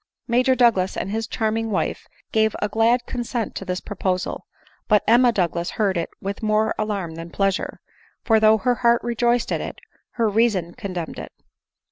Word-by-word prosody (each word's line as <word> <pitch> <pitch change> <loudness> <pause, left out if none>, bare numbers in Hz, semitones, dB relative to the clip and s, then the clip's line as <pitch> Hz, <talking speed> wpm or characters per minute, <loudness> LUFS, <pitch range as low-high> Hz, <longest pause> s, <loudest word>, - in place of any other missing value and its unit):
Major 255 +2 +3
Douglas 225 -7 +3
and 195 - -3
his 225 +1 -2
charming 225 0 -1
wife 200 - -2 0.2
gave 220 -1 +2
a 210 - 0
glad 230 +3 +2
consent 240 -2 -3
to 195 - -6
this 180 -1 -2
proposal: 185 -2 -3 0.4
but 210 -2 +4
Emma 240 +2 +6
Douglas 175 -4 -1
heard. 200 -4 +1
it 170 -1 -2
with 200 +1 -5
more 215 0 +2
alarm 200 -6 -2
than 165 +1 -8
pleasure; 195 +2 -1 0.4
for, 225 -2 +4
though 215 0 +5
her 245 +4 +1
heart 235 -1 +4
rejoiced 240 0 +1
at - - 0
it, - - -6 0.4
her 230 -2 +1
reason 205 -5 +1
condemned 180 -5 -5
it. - - -8
215 Hz, 170 wpm, -22 LUFS, 190-235 Hz, 0.4 s, Emma